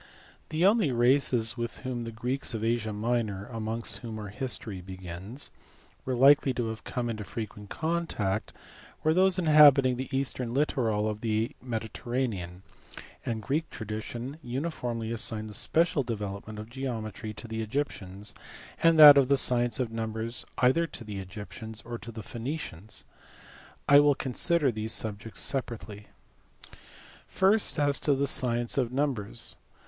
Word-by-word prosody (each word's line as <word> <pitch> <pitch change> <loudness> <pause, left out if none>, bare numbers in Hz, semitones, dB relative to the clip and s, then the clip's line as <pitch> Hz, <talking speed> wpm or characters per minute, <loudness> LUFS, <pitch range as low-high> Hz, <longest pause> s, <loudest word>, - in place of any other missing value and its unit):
The 160 +3 +1
only 205 - +4
races 120 -1 +3
with 120 -3 -4
whom 120 -2 -3
the 115 - -5
Greeks 125 +3 -2
of 110 - -3
Asia 115 -1 0
Minor 105 -2 -1
(amongst 115 -1 -3
whom 115 -3 -7
our 105 -2 -6
history 105 -3 -4
begins) 95 +7 -6 0.5
were 130 - -1
likely 135 0 +5
to 120 -2 -1
have 110 0 -6
come 125 -1 -3
into 110 -2 -3
frequent 105 -1 -7
contact 160 - -2 0.5
were 155 - +4
those 190 +1 +4
inhabiting 145 -6 +6
the 130 0 -4
eastern 130 -3 -1
littoral 115 -7 +1
of 105 0 -3
the 110 0 0
Mediterranean: 110 -6 -3 0.6
and 110 -2 -3
Greek 150 +8 -1
tradition 115 +5 -6
uniformly 120 -4 -3
assigned 110 -2 -1
the - - -8
special 160 +7 +2
development 105 -3 -5
of 105 0 -7
geometry 115 -4 -5
to 115 - -8
the 110 0 -3
Egyptians, 105 -5 -4 0.5
and 165 -1 +5
that 145 -2 +11
of 135 - +3
the 140 +1 +4
science 120 -2 +3
of 125 -3 -1
numbers 115 +1 -3
either 130 +7 +3
to 120 - -9
the 105 -3 -6
Egyptians 105 +3 -8
or 120 0 -5
to 115 - -8
the 110 -1 -8
Phoenicians. 115 - -5 0.8
I 145 0 +8
will 145 -1 +5
consider 145 +3 +1
these 110 0 -2
subjects 110 0 -2
separately. 110 -6 -3 1.2
First, 200 +1 +2
as 145 -2 +2
to 145 - +2
the 140 +1 +1
science 120 -1 +2
of 125 -2 0
numbers. 130 -7 -2
120 Hz, 145 wpm, -28 LUFS, 110-135 Hz, 1.2 s, that